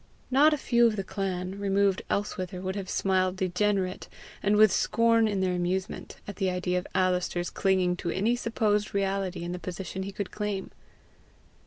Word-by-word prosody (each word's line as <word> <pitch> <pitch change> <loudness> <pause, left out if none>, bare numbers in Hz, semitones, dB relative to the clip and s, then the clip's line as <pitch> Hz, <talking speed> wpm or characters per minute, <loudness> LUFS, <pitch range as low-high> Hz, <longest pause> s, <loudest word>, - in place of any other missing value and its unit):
Not 290 +4 +6
a 300 - +1
few 240 -3 +3
of 220 - 0
the 195 - -2
clan, 190 0 -3
removed 200 -1 +2
elsewhither, 185 -3 -2
would 190 +1 -3
have 195 -2 -5
smiled 185 -1 +1
degenerate, 185 0 -1 0.3
and 205 +1 +2
with 215 -1 +6
scorn 230 +2 +3
in 200 -2 -1
their 185 -1 +1
amusement, 180 +2 -2
at 205 - -7
the 190 -2 +1
idea 180 0 0
of 180 - -9
Alister's 180 -1 0
clinging 185 -2 +2
to 175 - -3
any 210 +7 +1
supposed 215 -4 0
reality 195 -2 -1
in 175 - -4
the 180 - -4
position 185 +2 -5
he 195 +1 -4
could 200 0 -5
claim. 210 -2 -3
190 Hz, 175 wpm, -28 LUFS, 185-210 Hz, 0.3 s, Not